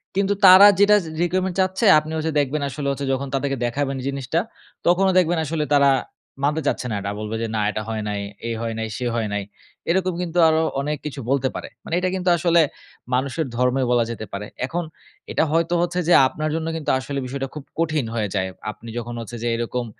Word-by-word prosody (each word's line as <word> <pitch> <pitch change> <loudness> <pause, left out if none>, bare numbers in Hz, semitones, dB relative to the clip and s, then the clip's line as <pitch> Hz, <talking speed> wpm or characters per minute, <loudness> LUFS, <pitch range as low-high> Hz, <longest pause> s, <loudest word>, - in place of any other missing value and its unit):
কিন্তু 200 +1 +2
তারা 190 +2 +10
যেটা 205 +1 +6
জি - - -6
re 170 - -1
requirement 185 +1 -1
চাচ্ছে 190 +3 +1
আপনি 155 +1 -8
ওইযে 160 +1 -1
দেখবেন 145 +1 0
আসলে 140 +1 -4
হচ্ছে 140 0 -3
যখন 135 +1 -2
তাদেরকে 135 0 -1
দেখাবেন 135 +3 -1
জিনিসটা, 140 +3 -1 0.5
তখনও 190 +2 +4
দেখবেন 175 -1 +3
আসলে 155 0 -1
তারা 140 -1 +5 0.6
মানতে 150 +2 +1
চাচ্ছে - - -1
না - - -1
এটা। 100 +1 -3
বলবে 110 +1 -4
যে, 115 - -1
"না 105 - +1
এটা 110 - -3
হয় 110 -1 -2
নাই, 105 - -2 0.3
এই 115 - -2
হয় 115 -1 -2
নাই, 110 - -2
সেই 125 -2 -2
হয় 110 -2 0
নাই।" 105 -1 -1 0.5
এরকম 185 +1 +1
কিন্তু 175 0 -4
আরো 160 0 +3 0.2
অনেক 150 +1 -2
কিছু 145 -2 -5
বলতে 135 -1 +2
পারে। - - -5 0.2
মানে - - -7
এইটা 185 0 0
কিন্তু 180 -1 0
আসলে 170 0 +4 0.5
মানুষের 140 +5 0
ধর্মেও 125 +1 +2
বলা 120 -1 +4
যেতে 110 -1 -6
পারে। 100 +1 -4 0.2
এখন 175 +5 -3 0.5
এটা - - +2
হয়তো 165 +1 +1
হচ্ছে 175 +1 -1
যে 175 - +5
আপনার 155 +3 -3
জন্য 160 0 -2
কিন্তু 160 -2 -1
আসলে 140 +1 -4
বিষয়টা 135 +1 -4
খুব 150 - -6 0.2
কঠিন 155 -6 +1
হয়ে 105 -2 0
যায়। 95 -1 0 0.2
আপনি 115 +2 -12
যখন 120 0 -5
হচ্ছে 115 +1 -7
যে - - 0
এরকম 120 +1 -2
145 Hz, 215 wpm, -22 LUFS, 125-170 Hz, 0.6 s, তারা